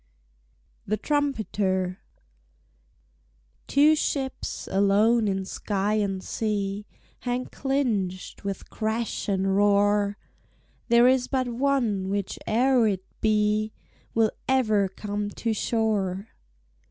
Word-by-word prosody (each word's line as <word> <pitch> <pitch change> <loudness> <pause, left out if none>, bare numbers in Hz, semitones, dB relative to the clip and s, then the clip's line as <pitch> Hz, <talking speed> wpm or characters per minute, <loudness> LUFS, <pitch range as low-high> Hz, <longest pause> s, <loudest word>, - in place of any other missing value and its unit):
THE 215 +2 0
TRUMPETER 205 - -1 1.7
Two 295 +3 +5
ships, 270 -3 -3
alone 210 +4 +3
in 190 -1 -1
sky 200 +1 -1
and 195 -3 -1
sea, 205 -2 -2 0.3
Hang 245 0 -2
clinched, 225 -10 -2
with 200 -1 -5
crash 220 0 -2
and 195 0 +1
roar; 205 0 +3 0.7
There 235 +1 +6
is 255 -1 +3
but 260 -2 0
one 240 -6 0
whiche'er 225 +5 +1
it 190 -1 -4 0.2
be 215 0 +2 0.4
Will 225 -1 +3 0.2
ever 215 -7 +3
come 205 +2 -4
to 225 +2 -2
shore. 210 -3 -1
210 Hz, 95 wpm, -26 LUFS, 200-240 Hz, 1.7 s, There